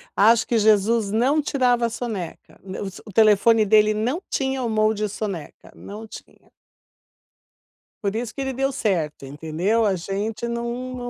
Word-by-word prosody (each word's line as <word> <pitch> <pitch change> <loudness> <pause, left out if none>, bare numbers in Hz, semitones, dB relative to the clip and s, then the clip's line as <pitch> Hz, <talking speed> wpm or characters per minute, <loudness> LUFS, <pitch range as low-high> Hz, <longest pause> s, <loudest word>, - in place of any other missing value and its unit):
Acho 225 +2 +5
que 235 - +1
Jesus 215 0 +3
não 265 +7 +2
tirava 250 -4 +1
a - - 0
soneca, 220 -8 -6
n 190 -1 -7
os 195 0 -6
o 210 - -10
telefone 215 +1 +4
dele 215 +1 +4
não 245 - -1
tinha 265 -1 -1
o 235 - -1
mode 215 -1 +1
soneca, 195 -6 -6
não 215 +2 -9
tinha. - - -14 1.5
Por 200 +1 -1
isso 230 0 -3
que 275 - -5
ele 265 -1 -2
deu 270 +2 0
certo, 165 - -2
entendeu? 160 +10 -1
A 200 -2 +2
gente 200 +6 -4
não 235 0 -3 0.2
não 245 -1 -5
220 Hz, 160 wpm, -23 LUFS, 200-235 Hz, 1.5 s, Acho